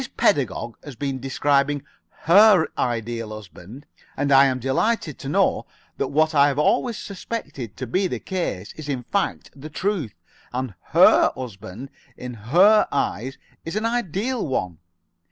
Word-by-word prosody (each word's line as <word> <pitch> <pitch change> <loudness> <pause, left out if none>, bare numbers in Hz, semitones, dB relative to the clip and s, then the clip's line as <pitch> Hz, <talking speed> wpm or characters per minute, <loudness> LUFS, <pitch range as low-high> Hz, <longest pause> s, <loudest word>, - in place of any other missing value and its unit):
Pedagog 120 - 0
has 145 -4 -9
been 135 +1 -3
describing 140 +2 +1 0.4
her 195 0 +6
Ideal 115 -1 -2
Husband, 110 - -11 0.3
and 140 +1 0
I 135 0 +7
am 130 -1 0
delighted 145 - -1
to 135 - -6
know - - +1 0.3
that - - -1
what 155 +2 +1
I 145 -1 +5
have 140 -1 -1
always 225 +10 +1
suspected 150 - -6
to 130 - -4
be 185 - 0
the - - -3
case 170 - -4
is 155 -2 -9
in 130 -3 -2
fact 200 - -2
the 145 +3 -9
truth: 170 - -2 0.4
that 130 -3 -3 0.2
her - - +6
husband 110 +1 -8 0.3
in 125 0 -7
her 175 - +4
eyes 135 -1 -2 0.3
is 165 - -6
an 215 +1 -1
ideal 230 +1 -1
one. 90 - -3
140 Hz, 150 wpm, -23 LUFS, 120-180 Hz, 0.4 s, I